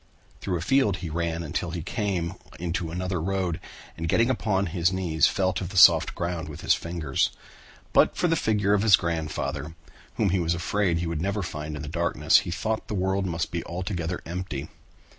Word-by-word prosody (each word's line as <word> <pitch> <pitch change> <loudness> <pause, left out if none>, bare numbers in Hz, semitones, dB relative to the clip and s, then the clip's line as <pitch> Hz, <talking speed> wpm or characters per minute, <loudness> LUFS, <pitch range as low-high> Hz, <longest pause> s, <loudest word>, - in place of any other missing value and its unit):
Through 90 -3 -2
a - - -5
field 105 -2 +2
he 80 - -4
ran 85 0 -2
until 85 +3 -3
he 85 -1 -4
came 95 -3 -2 0.3
into 85 0 -2
another 90 +1 -2
road 95 -2 -1 0.4
and 85 0 -4
getting 115 +8 +3
upon 100 -5 0
his 85 0 +2
knees 85 -5 +2
felt 95 0 0
of 90 - -4
the 95 - -6
soft - - +7
ground 85 -2 -3
with 75 - -8
his - - +4
fingers. 85 -5 -1 0.6
But - - +4
for 180 - +2
the 165 - +2
figure 105 -7 +1
of 105 - +3
his 105 -3 +7
grandfather, 80 -3 -3 0.4
whom 100 -4 +1
he 95 - +2
was 85 -1 +1
afraid 90 +1 0
he 85 - -2
would 80 -2 -2
never 100 +2 -1
find 75 -2 -5
in 75 - -6
the - - -6
darkness, 85 +3 +3
he - - -6
thought 110 +5 -2
the 105 - -3
world 95 +1 0
must 85 -2 -2
be - - -2
altogether 90 -1 -3
empty. 85 -5 -5
90 Hz, 200 wpm, -26 LUFS, 85-95 Hz, 0.6 s, soft